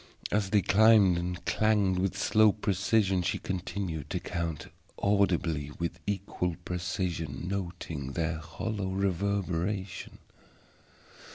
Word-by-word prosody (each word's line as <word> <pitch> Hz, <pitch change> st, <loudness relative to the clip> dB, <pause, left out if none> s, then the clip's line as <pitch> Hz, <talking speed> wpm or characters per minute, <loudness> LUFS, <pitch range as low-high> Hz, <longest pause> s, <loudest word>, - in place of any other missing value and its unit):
As 100 Hz, -2 st, +1 dB
they 100 Hz, 0 st, +3 dB
climbed 100 Hz, -4 st, +6 dB
and 90 Hz, 0 st, -4 dB
clanged 105 Hz, -4 st, +2 dB
with 95 Hz, +1 st, 0 dB
slow 110 Hz, +1 st, +4 dB
precision 100 Hz, -1 st, +1 dB
she 85 Hz, -, 0 dB
continued 90 Hz, -4 st, -4 dB
to -, -, -1 dB
count, 85 Hz, -3 st, -4 dB, 0.3 s
audibly 90 Hz, -7 st, +1 dB
and 75 Hz, -, -11 dB
with 85 Hz, 0 st, -3 dB
equal 95 Hz, -3 st, -2 dB
precision, 85 Hz, -3 st, -3 dB
noting 85 Hz, -7 st, -4 dB
their 80 Hz, 0 st, -1 dB
hollow 95 Hz, +5 st, -4 dB
reverberation. 95 Hz, 0 st, -1 dB
95 Hz, 110 wpm, -29 LUFS, 85-100 Hz, 0.3 s, climbed